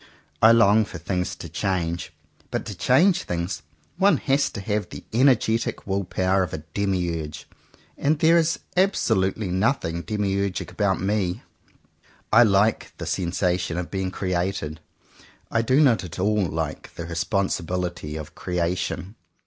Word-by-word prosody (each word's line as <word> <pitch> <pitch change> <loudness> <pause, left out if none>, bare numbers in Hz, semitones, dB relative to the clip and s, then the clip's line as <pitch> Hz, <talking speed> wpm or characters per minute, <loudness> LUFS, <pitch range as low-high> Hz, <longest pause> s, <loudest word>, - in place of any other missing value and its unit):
I 110 - +8
long 110 -2 +5
for 90 - -8
things 90 +2 -2
to - - -8
change; 85 -3 -2 0.4
but - - -3
to - - -5
change 170 +8 +3
things, 85 0 -3 0.4
one 200 +2 +4
has 140 +1 +1
to - - -7
have 105 +1 -2
the - - -9
energetic 115 -2 +2
will 100 0 -1
power 95 +2 +1
of 90 - -2
a 75 - -5
demiurge; 85 -6 -2 0.5
and 150 +2 +2
there 165 +2 +5
is 165 0 +3 0.2
absolutely 110 - +1
nothing 95 -3 0
demiurgic 100 -2 -2
about 100 -3 0
me. 100 +1 -1 0.9
I 115 - +8
like 105 -1 +3
the - - -5
sensation 90 -1 -1
of 90 -1 -4
being 95 -1 -1
created." 90 -4 -2 0.7
I 115 - +2
do 130 +5 +3
not 130 -9 +4
at 90 - -8
all 100 0 +1
like 80 0 -4
the 85 - -5
responsibility 85 -2 -2
of 80 +1 -7
"creation." 90 +2 -2
95 Hz, 140 wpm, -24 LUFS, 90-110 Hz, 0.9 s, I